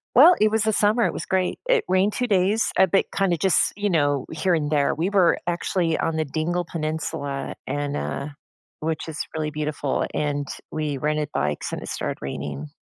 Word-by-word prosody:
Well, 305 Hz, +9 st, +9 dB
it 215 Hz, -, +5 dB
was 220 Hz, 0 st, +1 dB
a 220 Hz, -, +3 dB
summer, 215 Hz, +3 st, +3 dB
it -, -, +1 dB
was -, -, -5 dB
great, 185 Hz, -1 st, 0 dB
it -, -, +3 dB
rained 190 Hz, +3 st, +3 dB
two 250 Hz, -, 0 dB
days, 200 Hz, +2 st, +2 dB
a 190 Hz, -, +7 dB
bit, 195 Hz, +2 st, +2 dB
kinda 195 Hz, -3 st, +1 dB
just 185 Hz, +3 st, +3 dB
you 205 Hz, +1 st, -1 dB
know, 145 Hz, -5 st, +1 dB
here 165 Hz, +3 st, 0 dB
and 150 Hz, -2 st, -1 dB
there, 145 Hz, -2 st, +2 dB
we 170 Hz, +5 st, 0 dB
were 195 Hz, -4 st, +4 dB
actually 175 Hz, -1 st, 0 dB
on 165 Hz, -, 0 dB
the 160 Hz, -, +1 dB
Dingle 165 Hz, +5 st, -1 dB
Peninsula 155 Hz, -3 st, -3 dB
and, 145 Hz, +1 st, -2 dB
uh 140 Hz, -, -3 dB, 0.5 s
which 160 Hz, +1 st, -2 dB
is 160 Hz, -2 st, -6 dB, 0.2 s
really 155 Hz, -1 st, -2 dB
beautiful, 150 Hz, -2 st, -1 dB
and 145 Hz, -1 st, -1 dB, 0.2 s
we 150 Hz, -2 st, -2 dB
rented 150 Hz, +1 st, -1 dB
bikes, 75 Hz, +1 st, -1 dB
and -, -, -4 dB
it -, -, -8 dB
started -, -, -3 dB
raining, 70 Hz, +1 st, -5 dB
160 Hz, 195 wpm, -24 LUFS, 145-190 Hz, 0.5 s, Well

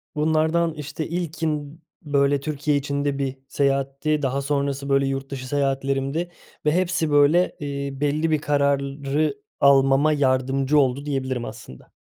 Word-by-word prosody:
bunlardan, 160 Hz, +2 st, +1 dB
işte, 150 Hz, +1 st, -5 dB
ilkin, 160 Hz, -3 st, -3 dB, 0.3 s
b 145 Hz, -1 st, -9 dB
böyle, 140 Hz, 0 st, +3 dB
Türkiye 145 Hz, 0 st, -1 dB
içinde 140 Hz, 0 st, -2 dB
bir 135 Hz, -1 st, -2 dB
seyahatti, 140 Hz, +2 st, 0 dB
daha 135 Hz, 0 st, -1 dB
sonrası, 140 Hz, 0 st, -2 dB
böyle, 135 Hz, 0 st, +3 dB
yurt 135 Hz, 0 st, -3 dB
dışı 130 Hz, -1 st, -5 dB
seyahatlerimdi 135 Hz, +4 st, -1 dB, 0.3 s
ve 150 Hz, -, +4 dB
hepsi, 180 Hz, -2 st, 0 dB
böyle, 145 Hz, +5 st, +4 dB
eee, 140 Hz, -1 st, -4 dB
belli 155 Hz, +2 st, +1 dB
bir 155 Hz, -, +2 dB
kararı 140 Hz, 0 st, 0 dB, 0.2 s
almama 140 Hz, +2 st, +5 dB
yardımcı 135 Hz, +1 st, +2 dB
oldu 135 Hz, +1 st, +1 dB
diyebilirim 130 Hz, -4 st, -2 dB
aslında. 65 Hz, -, -11 dB
140 Hz, 135 wpm, -23 LUFS, 135-150 Hz, 0.3 s, almama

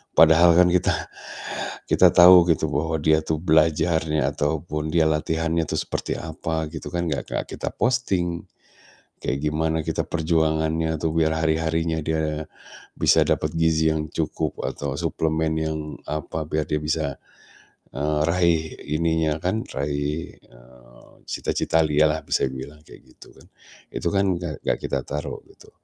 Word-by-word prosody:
Padahal 80 Hz, +1 st, +6 dB
kan 90 Hz, 0 st, +6 dB
kita 90 Hz, 0 st, +2 dB, 1.0 s
kita -, -, +6 dB
tahu 90 Hz, 0 st, +8 dB, 0.2 s
bahwa 80 Hz, +1 st, -1 dB
dia 80 Hz, +1 st, +3 dB
tuh 80 Hz, 0 st, -2 dB
belajarnya 80 Hz, -2 st, +2 dB
ataupun 75 Hz, +1 st, -2 dB
dia 80 Hz, -1 st, +3 dB
latihannya 80 Hz, +1 st, 0 dB
tuh -, -, -2 dB
seperti -, -, -3 dB
apa 80 Hz, 0 st, -3 dB
gitu 80 Hz, -, -7 dB
kan, 85 Hz, 0 st, -1 dB
gak 70 Hz, -, -3 dB
ke -, -, -4 dB
kita -, -, -3 dB
posting. 95 Hz, -9 st, 0 dB, 0.8 s
Kayak 70 Hz, +2 st, -2 dB
gimana 80 Hz, +1 st, 0 dB
kita 80 Hz, -, -1 dB
perjuangannya, 80 Hz, -1 st, 0 dB
atau 80 Hz, -, 0 dB
biar 80 Hz, -1 st, +3 dB
hari-harinya 80 Hz, +1 st, 0 dB
dia 80 Hz, -1 st, -1 dB, 0.5 s
bisa -, -, +4 dB
dapat -, -, 0 dB
gizi 80 Hz, -1 st, +2 dB
yang 75 Hz, 0 st, -3 dB
cukup, 80 Hz, -2 st, -3 dB
atau 70 Hz, -2 st, -4 dB
suplemen 80 Hz, 0 st, 0 dB
yang 80 Hz, 0 st, -2 dB, 0.3 s
apa, 75 Hz, +1 st, -4 dB
biar 75 Hz, -1 st, -1 dB
dia 75 Hz, -, 0 dB
bisa, 75 Hz, -2 st, -1 dB, 0.8 s
eee, 75 Hz, +2 st, -1 dB
raih 85 Hz, -2 st, +2 dB, 0.3 s
ininya 80 Hz, -1 st, +1 dB
kan, 100 Hz, +6 st, -1 dB
raih, 70 Hz, +3 st, -3 dB
eee, -, -, -20 dB, 0.2 s
cita-cita 80 Hz, 0 st, 0 dB
dia 75 Hz, 0 st, +3 dB
lah, 80 Hz, +1 st, -1 dB
bisa -, -, +1 dB
dibilang 65 Hz, +3 st, -9 dB
kayak -, -, -14 dB, 0.2 s
gitu -, -, -15 dB
kan. -, -, -18 dB, 0.5 s
Itu -, -, -2 dB
kan 95 Hz, -1 st, +2 dB
gak 85 Hz, -5 st, -6 dB
gak -, -, 0 dB
kita 70 Hz, -1 st, -2 dB
taruh 75 Hz, 0 st, -5 dB
gitu. -, -, -18 dB
80 Hz, 145 wpm, -23 LUFS, 75-80 Hz, 1.0 s, tahu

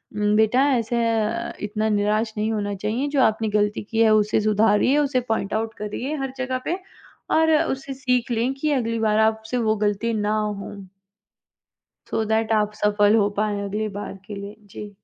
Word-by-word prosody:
उम, 210 Hz, 0 st, +1 dB
बेटा 220 Hz, +6 st, +3 dB
ऐसे 235 Hz, 0 st, 0 dB
अ, 225 Hz, +1 st, -1 dB
इतना 215 Hz, +1 st, -1 dB
निराश 215 Hz, +1 st, +1 dB
नहीं 215 Hz, +1 st, 0 dB
होना 205 Hz, -1 st, -2 dB
चाहिए 215 Hz, +8 st, -2 dB
जो -, -, +5 dB
आपने 220 Hz, -1 st, +1 dB
गलती 210 Hz, 0 st, 0 dB
की 225 Hz, +2 st, -4 dB
है, 220 Hz, -1 st, +5 dB
उसे 215 Hz, 0 st, +2 dB
सुधारिए, 215 Hz, +5 st, +3 dB
उसे 280 Hz, -3 st, +1 dB
पॉइंट 220 Hz, -3 st, -1 dB
आउट 225 Hz, +1 st, -1 dB
करिए 225 Hz, +8 st, -4 dB
हर 270 Hz, -1 st, -4 dB
जगह 260 Hz, 0 st, -2 dB
पे 360 Hz, -, -1 dB, 0.6 s
और 320 Hz, 0 st, +4 dB, 0.2 s
उससे 270 Hz, +1 st, -5 dB
सीख 250 Hz, -2 st, 0 dB
लें 235 Hz, +3 st, 0 dB
कि 300 Hz, +2 st, -1 dB
अगली 230 Hz, -4 st, -1 dB
बार 215 Hz, -1 st, +2 dB
आपसे 220 Hz, +2 st, +1 dB
वो 220 Hz, -2 st, +1 dB
गलती 210 Hz, +2 st, 0 dB
ना 210 Hz, -1 st, 0 dB
हो। 210 Hz, -2 st, -4 dB, 1.4 s
सो 225 Hz, -, 0 dB
दैट 220 Hz, 0 st, 0 dB
आप 210 Hz, -1 st, +1 dB
सफल 205 Hz, 0 st, +4 dB
हो 205 Hz, -2 st, +3 dB
पाएँ 210 Hz, -1 st, 0 dB
अगली 210 Hz, +2 st, -2 dB
बार 205 Hz, -, -6 dB
के 210 Hz, -, -6 dB
लिए, 200 Hz, +1 st, -8 dB
जी। 210 Hz, 0 st, -10 dB
220 Hz, 185 wpm, -23 LUFS, 210-235 Hz, 1.4 s, जो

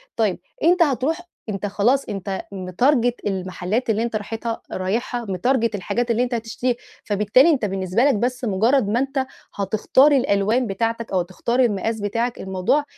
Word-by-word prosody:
طيب 215 Hz, -5 st, +1 dB, 0.2 s
أنت 350 Hz, +2 st, +5 dB
هتروح 295 Hz, +4 st, 0 dB, 0.3 s
أنت 195 Hz, -1 st, -3 dB
خلاص 230 Hz, +7 st, +2 dB
أنت 195 Hz, -1 st, -3 dB
متارجيت 235 Hz, +7 st, +1 dB
المحلات 190 Hz, +4 st, -2 dB
اللي 220 Hz, +1 st, +2 dB
أنت 235 Hz, -2 st, -3 dB
راحتها 225 Hz, +2 st, -4 dB
رايحها 230 Hz, +6 st, -2 dB
متارجيت 230 Hz, +4 st, +1 dB
الحاجات 235 Hz, +5 st, -1 dB
اللي 235 Hz, +2 st, +2 dB
أنت 250 Hz, -, -3 dB
هتشتريها، 235 Hz, +2 st, -1 dB, 0.3 s
فبالتالي 210 Hz, -, +4 dB
أنت 270 Hz, -9 st, +2 dB
بالنسبة 190 Hz, +3 st, 0 dB
لك 280 Hz, -2 st, +4 dB
بس 250 Hz, +4 st, -1 dB
مجرد 225 Hz, +3 st, +2 dB
ما 230 Hz, +4 st, +1 dB
أنت 270 Hz, 0 st, -1 dB, 0.3 s
هتختار 215 Hz, +8 st, +3 dB
الألوان 230 Hz, -1 st, +2 dB
بتاعتك 230 Hz, +3 st, -2 dB
أو 185 Hz, -, +2 dB
تختار 190 Hz, +7 st, -2 dB
المقاس 220 Hz, -2 st, +1 dB
بتاعك 230 Hz, +4 st, -1 dB
الموضوع 190 Hz, +10 st, 0 dB
225 Hz, 155 wpm, -22 LUFS, 200-250 Hz, 0.3 s, أنت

